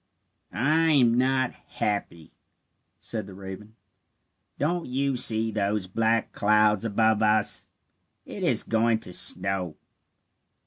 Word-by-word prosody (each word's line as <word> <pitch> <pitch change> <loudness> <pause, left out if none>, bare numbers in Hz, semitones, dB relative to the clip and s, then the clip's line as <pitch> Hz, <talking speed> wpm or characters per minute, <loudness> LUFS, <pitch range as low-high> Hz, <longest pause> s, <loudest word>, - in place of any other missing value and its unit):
"I 160 +4 +1
am 125 -5 +4
not 130 0 0
happy," 85 -6 -5 0.7
said 110 -2 -5
the 95 - -12
raven. 100 +3 -10 0.8
"Don't 170 +3 -2
you 135 +1 -1
see 110 -2 +4
those 105 -1 -2
black 115 +4 -1
clouds 105 0 +2
above 110 0 +1
us? 110 -1 0 0.6
It - - -9
is - - +1
going 115 0 +1
to 90 - -3
snow." 90 -3 +2
110 Hz, 115 wpm, -25 LUFS, 100-125 Hz, 0.8 s, am